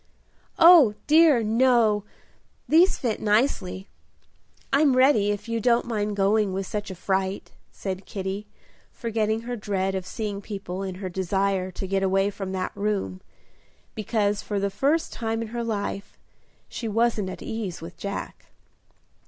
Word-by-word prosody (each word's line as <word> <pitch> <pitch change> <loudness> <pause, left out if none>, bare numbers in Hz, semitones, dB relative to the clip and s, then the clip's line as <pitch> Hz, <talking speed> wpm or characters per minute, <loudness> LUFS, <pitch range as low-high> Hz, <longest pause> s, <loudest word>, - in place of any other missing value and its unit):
"Oh, 330 -11 +8
dear, 305 -6 +5
no! 225 -2 +3 0.6
these 340 +5 +5
fit 230 -4 -2
nicely. 210 -4 0 0.9
I'm 280 -1 +4
ready, 255 -6 +4
if 205 +1 -3
you 230 0 -1
don't 240 0 +3
mind 210 -3 -2
going 200 0 +2
with 195 +1 -2
such 210 0 -4
a 190 - -6
fright," 190 +2 -2 0.2
said 190 -1 -6
Kitty, 195 +1 -4 0.4
forgetting 220 -1 -1
her 245 +1 -4
dread 195 -3 -2
of 190 -1 -4
seeing 205 -2 -4
people 195 -3 -6
in 190 -2 -4
her 190 0 -5
desire 190 +1 -1
to 190 - -5
get 195 +1 0
away 195 +1 +2
from 195 -1 -6
that 185 -1 -2
room, 200 - -2 0.7
because 210 -1 0
for 205 -1 -3
the 200 0 -1
first 290 +10 0
time 225 -1 -2
in 225 - -7
her 235 +1 -3
life 205 -3 -4 0.5
she 230 - -5
wasn't 220 -2 +1
at - - -8
ease 215 -6 -4
with 165 +2 -9
Jack. 200 0 -6
205 Hz, 150 wpm, -25 LUFS, 195-230 Hz, 0.9 s, Oh